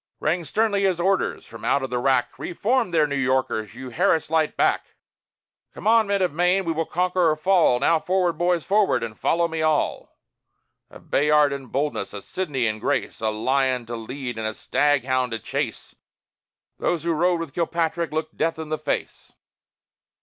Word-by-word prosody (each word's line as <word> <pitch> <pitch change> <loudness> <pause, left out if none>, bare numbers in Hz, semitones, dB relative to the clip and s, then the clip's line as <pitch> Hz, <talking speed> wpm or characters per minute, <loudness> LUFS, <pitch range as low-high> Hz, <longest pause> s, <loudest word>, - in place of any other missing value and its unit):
Rang 170 +3 0
sternly 205 +5 +1
his 190 -3 +1
orders 190 +2 0
from - - -12
out 140 - +1
of 130 - -4
the 125 - 0
wrack: 130 -1 +1
_Re 175 - -6
form 240 -1 +1
there, 160 -3 +3
New 140 -1 -3
Yorkers! 130 -5 0
You, 130 0 -8
"Harris 165 0 +1
Light," 160 -1 +1
back! - - 0 0.8
Come - - -10
on, 225 -1 +4
men 200 -1 +1
of 180 - 0
Maine! 180 +3 +2
We 165 - 0
will 165 0 -2
conquer 180 -1 +1
or 155 - +2
fall! 165 -6 +3
Now, 160 +4 +3
forward, 180 +1 +1
boys, 175 -1 0
forward! 205 0 +2
and 110 -2 -5
follow 170 +8 +1
me 160 -1 -3
all!_ 155 -1 0 0.8
A - - -13
Bayard 150 0 +3
in 135 -2 -6
boldness, 135 -6 -2
a 100 - -7
Sidney 145 -10 -2
in 110 -1 -1
grace, - - -1
A 110 - +1
lion 130 +3 0
to 120 +1 -5
lead 120 +1 -6
and 110 - -2
a 110 - -4
stag 145 -3 +1
hound 130 -2 0
to - - -1
chase - - -4 0.9
Those 170 -2 0
who 170 0 +1
rode 175 +2 +2
with 165 -5 -6
Kilpatrick 170 0 -1
looked 155 +1 -3
Death 165 - 0
in 160 -1 -6
the 155 - -2
face! - - -4
155 Hz, 190 wpm, -23 LUFS, 130-175 Hz, 0.9 s, on